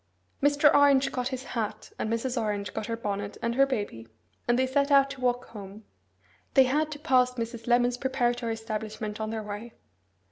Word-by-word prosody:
Mr. 290 +1 +5
Orange 280 -1 +5
got 250 -1 -2
his 260 -1 -4
hat, 225 -5 -4
and 220 - -2
Mrs. 240 +2 -1
Orange 205 -4 -2
got 210 - -4
her 230 -1 -2
bonnet 205 -2 -4
and 235 0 -1
her 275 +2 +4
baby, 205 - -4 0.4
and 240 0 +3
they 260 - +3
set 280 +2 +1
out 275 -1 +5
to 275 -2 -9
walk 245 0 +1
home. 205 0 -10 0.7
They 265 - +8
had 300 +4 +1
to - - -7
pass 255 -4 +2
Mrs. 230 -1 -5
Lemon's 245 0 +3
preparatory 245 -3 0
establishment 215 -1 -5
on 215 - -2
their 220 -1 -3
way. 210 +3 -7
240 Hz, 185 wpm, -28 LUFS, 220-265 Hz, 0.7 s, They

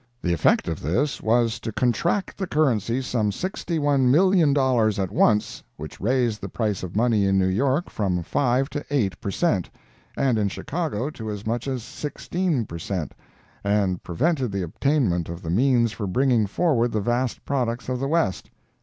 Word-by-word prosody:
The 85 - +1
effect 85 - +2
of 80 -2 -3
this 125 - 0
was 115 0 +2
to 115 - -5
contract 150 - 0
the 190 - -2
currency 130 - +1
some 115 -4 0
$61,000,000 145 - +2
at 95 -1 -1
once, 105 0 +2 0.2
which - - -9
raised 120 0 +1
the - - -5
price 105 -5 -2
of 90 0 -7
money 110 -3 +2
in 95 0 +2
New 95 - +3
York 135 - +1
from 90 -4 -1
five 130 - +1
to 145 - -4
eight 120 -10 0
per - - -3
cent., 100 - 0 0.5
and 130 -5 +2
in 100 -1 +1
Chicago 145 - -3
to 110 -7 -7
as 105 -1 -5
much 120 +3 -2
as 130 -4 -3
sixteen 150 +2 -2
percent., 85 -2 -4 0.5
and 100 -3 +1
prevented 130 - 0
the 100 -1 -2
obtainment 90 - 0
of 85 +1 -7
the 80 - -3
means 120 +2 +3
for 105 -2 -4
bringing 120 +1 +2
forward 120 - +1
the 110 - +1
vast 120 +3 -1
products 125 -4 -1
of 125 -1 -2
the 135 - -1
West. 155 - 0
120 Hz, 170 wpm, -24 LUFS, 100-140 Hz, 0.5 s, New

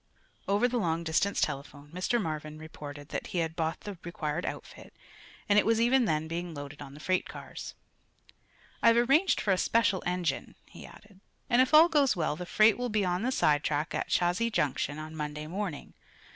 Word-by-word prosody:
Over 205 +5 +3
the 245 0 -1
long 165 -4 -1
distance 170 +5 +1
telephone 145 +1 -4
Mr. 185 +7 0
Marvin 155 -5 -4
reported 145 -2 -9
that - - -4
he - - -5
had 165 -1 -1
bought 160 -1 -2
the 200 -4 -8
required 165 -1 -3
outfit - - -8 0.5
and 205 0 +5
it - - +3
was 225 0 +2
even 245 +2 +4
then 155 -5 0
being 170 0 -5
loaded 145 0 -8
on 140 -1 -9
the - - -11
freight 185 +4 0
cars. - - -8 1.1
"I've 230 0 +5
arranged 275 +10 +3
for 200 - 0
a 185 - +2
special 225 -5 +2
engine," 175 -5 -2
he - - -12
added, 205 -2 -17 0.3
"and 240 +1 +6
if 260 - +2
all 315 +2 +8
goes 290 -5 +3
well 155 -4 -1
the 180 +2 -7
freight 215 +3 +4
will 245 0 -1
be 210 -2 +1
on 180 0 0
the 250 +3 0
sidetrack 150 - +1
at - - -2
Chazy 180 +7 +1
Junction 145 -4 -1
on 155 +1 -8
Monday 150 0 -5
morning. 180 -2 -5
175 Hz, 190 wpm, -29 LUFS, 155-220 Hz, 1.1 s, all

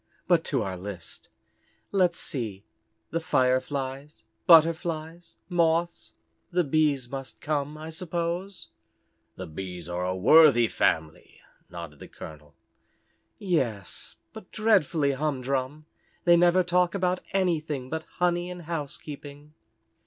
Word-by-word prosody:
But 170 -3 +4
to 135 -6 0
our 95 -2 -4
list. 90 -2 -8 0.6
Let's 180 -4 +2
see, 110 -7 -4 0.5
the 165 - 0
Fireflies, 135 0 -1 0.2
Butterflies, 165 0 +3
Moths. 165 - 0 0.4
The 180 0 +2
Bees 145 -4 +1
must 135 +1 -7
come, 150 0 -2
I 155 +1 -7
suppose." 175 +2 -3 0.7
"The - - -6
Bees 90 +1 -7
are 90 +1 -3
a 90 0 -1
worthy 120 - +6
family," 80 -6 -1 0.3
nodded 85 -4 -9
the - - -10
colonel. 75 -2 -12 0.8
"Yes, 130 - -2 0.2
but - - -11
dreadfully 180 -9 +2
humdrum. 135 0 -2 0.4
They 175 -1 +7
never 175 +1 +4
talk 180 0 +2
about 180 -1 +1
anything 155 -8 -1
but 160 0 -3
honey 175 0 +1
and 180 -1 -8
housekeeping." 150 -2 -7
150 Hz, 115 wpm, -27 LUFS, 125-170 Hz, 0.8 s, They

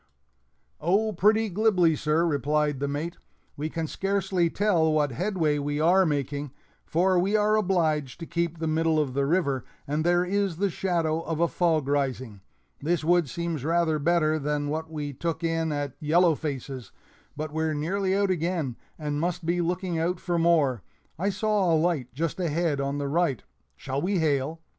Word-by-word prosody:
"Oh, 205 +7 +1
pretty 215 +5 +3
glibly, 185 -5 +3
sir," 155 +3 +1
replied 150 -1 0
the 140 - -1
mate; 155 +5 -4 0.4
"we 150 +2 -3
can 165 0 -3
scarcely 190 0 0
tell 175 -5 +2
what 150 -2 +1
headway 165 - 0
we 145 +1 -2
are 180 +4 +4
making, 145 -1 -2 0.4
for 180 +2 +2
we 195 +4 +1
are 210 0 +3
obliged 160 -9 0
to - - -4
keep 170 0 -2
the 160 - -3
middle 160 0 +2
of 140 -4 -1
the 140 +1 0
river, 140 -6 +1 0.2
and 150 +2 -1
there 175 +1 +3
is 195 -2 0
the 200 +1 0
shadow 165 -3 0
of 165 -1 -4
a 170 - +3
fog 160 -5 +1
rising. 130 -7 -2 0.4
This 165 +2 0
wood 170 -2 +3
seems 170 -4 -3
rather 165 -1 +1
better 155 0 +2
than 145 0 -1
that 160 +1 -3
we 150 -2 -5
took 165 +4 -3
in 165 -1 0
at 145 -2 -3
Yellow 165 +3 +4
Face's, 135 -6 -5 0.5
but 155 0 -4
we're 160 0 0
nearly 190 +6 0
out 200 -1 +2
again, 165 -7 -1 0.2
and 150 -1 -3
must 175 0 -2
be 175 +1 +1
looking 175 0 -1
out 170 +2 0
for 175 -2 -1
more. 155 -7 +3 0.4
I 195 +3 +1
saw 205 -2 +1
a 160 - +4
light 155 -6 0
just 165 +6 -3
ahead 165 -4 0
on 140 +1 -2
the 145 -1 -2
right 150 -3 0 0.3
shall 135 +1 -4
we 190 +2 0
hail?" 155 0 0
160 Hz, 175 wpm, -26 LUFS, 150-175 Hz, 0.5 s, are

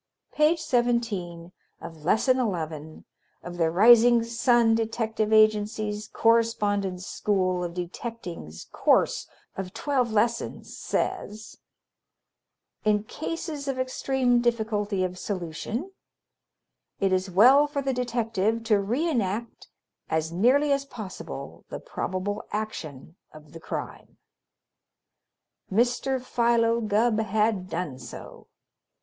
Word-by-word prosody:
Page 305 +2 +3
Seventeen 225 - -1 0.3
of 165 -2 -10
Lesson 255 - +3
Eleven 160 - -4 0.4
of 175 0 -7
the 165 -2 +2
Rising 235 +6 +6
Sun 230 0 +3
Detective 225 -1 -1
Agency's 215 -1 +2
Correspondence 205 -5 +1
School 185 -4 0
of 170 0 -5
Detecting's 180 - -7
Course - - +2 0.3
of 190 +1 -6
Twelve 255 -1 0
Lessons, 230 +2 -1
says: 215 +1 -3 1.3
In 210 -1 +2
cases 310 +3 -5
of 270 -1 -2
extreme 255 -1 +1
difficulty 215 -4 0
of 180 0 -3
solution 205 - -4 1.1
it 195 -1 +2
is 185 +1 0
well 255 +11 +6
for 285 -1 -3
the 270 0 0
detective 230 -3 -1
to 215 -3 +2
reënact 235 - -2 0.4
as 160 0 -1
nearly 255 - +3
as 275 0 +2
possible 225 -8 -8
the - - -6
probable 185 +2 -4
action 170 -8 -6
of 155 0 -15
the 165 - -9
crime. - - -7 1.5
Mr. 245 +5 +1
Philo 235 -2 +2
Gubb 215 +1 +2
had 215 -3 0
done 165 -6 -4
so. 120 - -11
220 Hz, 105 wpm, -26 LUFS, 185-240 Hz, 1.5 s, Rising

